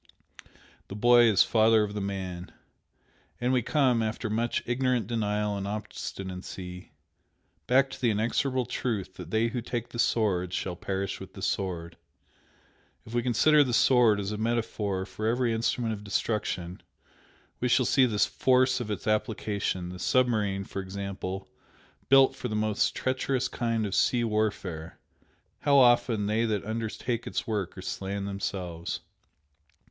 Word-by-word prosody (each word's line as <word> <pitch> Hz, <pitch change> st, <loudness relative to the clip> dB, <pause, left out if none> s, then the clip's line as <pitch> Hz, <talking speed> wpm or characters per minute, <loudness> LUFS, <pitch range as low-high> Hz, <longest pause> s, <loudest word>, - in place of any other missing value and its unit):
The 100 Hz, -, -7 dB
boy 120 Hz, +2 st, +6 dB
is 105 Hz, -4 st, +5 dB
father 110 Hz, -1 st, +4 dB
of 105 Hz, -1 st, -4 dB
the 105 Hz, -, -3 dB
man. 95 Hz, -2 st, -5 dB, 0.9 s
And 125 Hz, +2 st, +1 dB
we 125 Hz, -, +3 dB
come, 125 Hz, -2 st, +2 dB
after 110 Hz, 0 st, -2 dB
much 115 Hz, +2 st, 0 dB
ignorant 125 Hz, -2 st, +1 dB
denial 105 Hz, -2 st, -1 dB
and 100 Hz, 0 st, -4 dB
obstinacy, 95 Hz, -3 st, -6 dB, 0.8 s
back 135 Hz, +2 st, +4 dB
to 135 Hz, -, -9 dB
the 120 Hz, -, +3 dB
inexorable 120 Hz, +4 st, 0 dB
truth 110 Hz, -6 st, -3 dB
that 90 Hz, -3 st, -8 dB
'they 110 Hz, +4 st, +1 dB
who 120 Hz, +1 st, -3 dB
take 120 Hz, 0 st, -4 dB
the 120 Hz, -, -7 dB
sword 95 Hz, -7 st, +1 dB
shall 90 Hz, -2 st, -2 dB
perish 95 Hz, +2 st, -3 dB
with -, -, -10 dB
the -, -, -9 dB
sword.' 85 Hz, -3 st, -2 dB, 1.1 s
If 110 Hz, -, -11 dB
we 120 Hz, -, +2 dB
consider 135 Hz, +6 st, +4 dB
the 125 Hz, -4 st, 0 dB
'sword' 120 Hz, -6 st, +5 dB
as 100 Hz, 0 st, -3 dB
a 105 Hz, -, -4 dB
metaphor 110 Hz, -4 st, -1 dB
for 110 Hz, +2 st, -4 dB
every 120 Hz, 0 st, +1 dB
instrument 115 Hz, 0 st, 0 dB
of 105 Hz, -1 st, -7 dB
destruction, 95 Hz, -4 st, -2 dB, 0.8 s
we 125 Hz, -, 0 dB
shall 125 Hz, +1 st, +3 dB
see 130 Hz, +1 st, +4 dB
the 110 Hz, -3 st, -2 dB
force 130 Hz, +3 st, +3 dB
of 120 Hz, -3 st, -5 dB
its 105 Hz, -, -4 dB
application 105 Hz, -4 st, -1 dB
the 90 Hz, 0 st, -8 dB
submarine, 105 Hz, -6 st, +1 dB
for 100 Hz, -, -5 dB
example, 95 Hz, 0 st, -5 dB, 0.6 s
built 135 Hz, 0 st, +6 dB
for 125 Hz, -, -4 dB
the 110 Hz, -, -3 dB
most 105 Hz, -1 st, +1 dB
treacherous 130 Hz, 0 st, 0 dB
kind 115 Hz, -2 st, -1 dB
of 100 Hz, -, -4 dB
sea 120 Hz, +3 st, +2 dB
warfare 100 Hz, -7 st, -2 dB, 0.6 s
how 145 Hz, -1 st, +3 dB
often 120 Hz, -4 st, +4 dB
they 110 Hz, +2 st, +1 dB
that 105 Hz, -3 st, -1 dB
undertake 115 Hz, +2 st, -3 dB
its -, -, -2 dB
work 105 Hz, -6 st, -3 dB
are 95 Hz, -, -7 dB
slain 100 Hz, +1 st, -4 dB
themselves! 95 Hz, -4 st, -4 dB
110 Hz, 150 wpm, -28 LUFS, 100-120 Hz, 1.1 s, boy